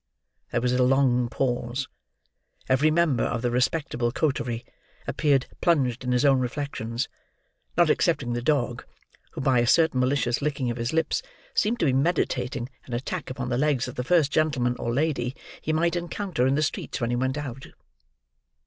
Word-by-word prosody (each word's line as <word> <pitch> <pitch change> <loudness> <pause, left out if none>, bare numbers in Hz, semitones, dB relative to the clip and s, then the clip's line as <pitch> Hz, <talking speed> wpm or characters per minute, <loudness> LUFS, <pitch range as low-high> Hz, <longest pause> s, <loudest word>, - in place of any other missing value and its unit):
There 120 - 0
was 125 0 +1
a 125 - +2
long 125 -2 +3
pause. 125 +1 -1 0.8
Every 130 +4 +4
member 155 -6 +2
of 115 0 -2
the 120 - +1
respectable 125 -1 0
coterie 120 -5 -1 0.4
appeared 140 -4 +2 0.2
plunged 130 -8 +2
in 125 - -1
his 125 +3 +2
own 135 -2 +5
reflections; 125 -2 -3 0.7
not - - +5
excepting 120 - +1
the 120 - -2
dog, 125 -3 0 0.5
who - - -5
by 130 -2 +3
a 120 - +2
certain 160 -1 +4
malicious 125 -1 +1
licking 140 -4 -1
of 120 - -5
his 115 0 -2
lips 160 0 +1 0.3
seemed 230 +3 +1
to - - +3
be 135 - +3
meditating 130 -5 0 0.2
an 125 - -7
attack 145 +7 -4
upon 130 -1 -4
the 120 0 0
legs 140 -4 +1
of 125 - -6
the 125 - -3
first 155 -1 +3
gentleman 135 -6 +1
or 120 - -2
lady 135 -2 0 0.3
he 155 - -1
might 170 +2 +1
encounter 175 -5 -1
in 135 - +2
the 155 - +1
streets 155 - -3
when 120 0 -1
he - - +1
went 130 +3 0
out. 135 -3 -6
130 Hz, 175 wpm, -26 LUFS, 120-150 Hz, 0.8 s, own